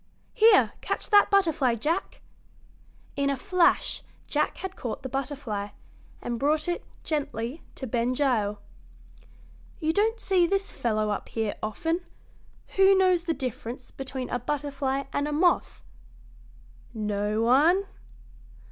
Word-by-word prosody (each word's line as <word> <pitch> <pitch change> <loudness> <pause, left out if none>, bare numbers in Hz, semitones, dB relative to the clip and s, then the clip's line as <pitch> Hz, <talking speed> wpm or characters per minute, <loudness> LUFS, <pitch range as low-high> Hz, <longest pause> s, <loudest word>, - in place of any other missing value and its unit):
Here, 445 +1 +6
catch - - -3
that 410 -1 +7
butterfly, 320 -11 +3
Jack!" 320 - -2 0.9
In 280 0 +1
a 275 - 0
flash 355 +5 +2 0.2
Jack 300 0 0
had 380 0 -6
caught 245 +1 -5
the 260 - -4
butterfly, 260 -6 -3 0.6
and 240 -1 -3
brought 300 +4 +1
it, 350 - -2 0.2
gently, 280 -2 -3
to 265 - -6
Ben 240 +1 0
Gile. 225 -7 +1 1.2
"You 320 -2 0
don't 445 +4 +1
see 365 -5 +3
this 390 +2 0
fellow 215 -2 0
up 205 - -4
here 220 -2 -1
often. 325 - -1 0.8
Who 390 0 +7
knows 365 -2 +3
the 330 -2 0
difference 250 -1 -5
between 265 -1 -5
a 245 - 0
butterfly 275 -1 -2
and 285 +1 0
a - - -3
moth? 345 +4 +1 1.1
No 210 0 -1
one? 305 +11 +4
280 Hz, 130 wpm, -27 LUFS, 235-345 Hz, 1.2 s, that